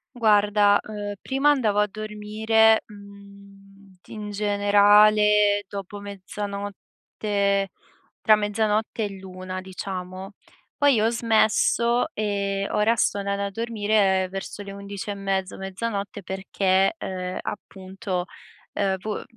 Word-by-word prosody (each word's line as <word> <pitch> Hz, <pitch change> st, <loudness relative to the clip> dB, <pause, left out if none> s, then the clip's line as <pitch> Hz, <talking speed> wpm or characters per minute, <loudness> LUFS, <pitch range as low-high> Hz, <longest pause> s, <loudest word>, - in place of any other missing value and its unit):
Guarda, 210 Hz, -2 st, +4 dB
uhm, 205 Hz, -1 st, -5 dB
prima 270 Hz, +2 st, +1 dB
andavo 225 Hz, -8 st, +1 dB
a 210 Hz, -, +3 dB
dormire, 215 Hz, +1 st, +2 dB
mhmm, 200 Hz, -1 st, -16 dB
t -, -, -24 dB
in 210 Hz, -1 st, -6 dB
generale 205 Hz, 0 st, +4 dB
dopo 200 Hz, 0 st, -7 dB
mezzanotte, 200 Hz, 0 st, -3 dB, 0.5 s
tra 215 Hz, -, +5 dB
mezzanotte 215 Hz, +1 st, -1 dB
e 200 Hz, -2 st, -5 dB
l'1 185 Hz, 0 st, -7 dB
diciamo. 185 Hz, 0 st, -7 dB, 0.5 s
Poi 285 Hz, -5 st, +4 dB
ho 220 Hz, +1 st, +3 dB
smesso, 235 Hz, +1 st, +2 dB
ehm, 200 Hz, -2 st, -2 dB
ora 215 Hz, +2 st, +3 dB
sto 205 Hz, -2 st, +1 dB
andando 200 Hz, 0 st, -2 dB
a 200 Hz, -, -3 dB
dormire 205 Hz, -3 st, +1 dB
verso 195 Hz, +1 st, -6 dB
le 200 Hz, -, -8 dB
11 200 Hz, +1 st, -6 dB
e -, -, -2 dB
mezzo, 195 Hz, -1 st, -2 dB
mezzanotte 200 Hz, +1 st, -4 dB
perché, 190 Hz, -, +1 dB
ehm, 185 Hz, -, -5 dB
appunto, 190 Hz, -2 st, -5 dB, 0.5 s
uhm, 195 Hz, -1 st, 0 dB
vo 215 Hz, +1 st, -4 dB
205 Hz, 115 wpm, -24 LUFS, 195-215 Hz, 0.5 s, tra